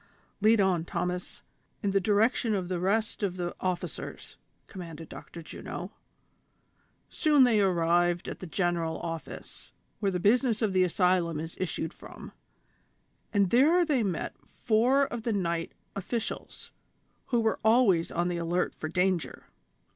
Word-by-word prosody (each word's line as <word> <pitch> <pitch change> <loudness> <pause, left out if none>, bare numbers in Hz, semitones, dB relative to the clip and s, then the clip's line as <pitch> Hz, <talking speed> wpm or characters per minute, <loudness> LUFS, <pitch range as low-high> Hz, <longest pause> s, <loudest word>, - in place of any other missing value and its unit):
" - - -39
Lead 220 +1 +5
on, 185 -4 +2
Thomas, 180 +1 -4 0.4
in 200 - +1
the 195 - +3
direction 215 +3 +2
of 185 -2 -3
the 180 -2 -1
rest 215 +6 0
of 190 -3 -1
the 175 -1 -3
officers," 185 -2 -4 0.3
commanded 165 -5 -9
Dr. 170 - -10
Juno. - - -7 1.2
Soon 300 -4 +4
they 230 -4 +4
arrived 175 -1 +2
at - - -6
the 185 - -7
general 170 -2 -1
office, 165 -1 -7 0.3
where 200 -2 +1
the 180 - -1
business 230 +4 +2
of 205 -3 +1
the 185 0 +4
asylum 180 -3 +2
is 165 +1 -6
issued 165 -2 -3
from, - - -11 1.0
and 200 -3 +2
there 320 +9 +5
they 290 -6 +2
met 190 -6 -2 0.3
four 250 +5 +4
of 240 -3 -5
the 230 0 -1
night 170 -4 -1 0.2
officials, 220 +4 -5 0.6
who 240 - +2
were 225 -1 +1
always 220 -7 +4
on 175 +1 0
the 175 -1 -1
alert 170 +1 0
for 155 - -5
danger. 180 0 0
185 Hz, 145 wpm, -29 LUFS, 175-220 Hz, 1.2 s, Lead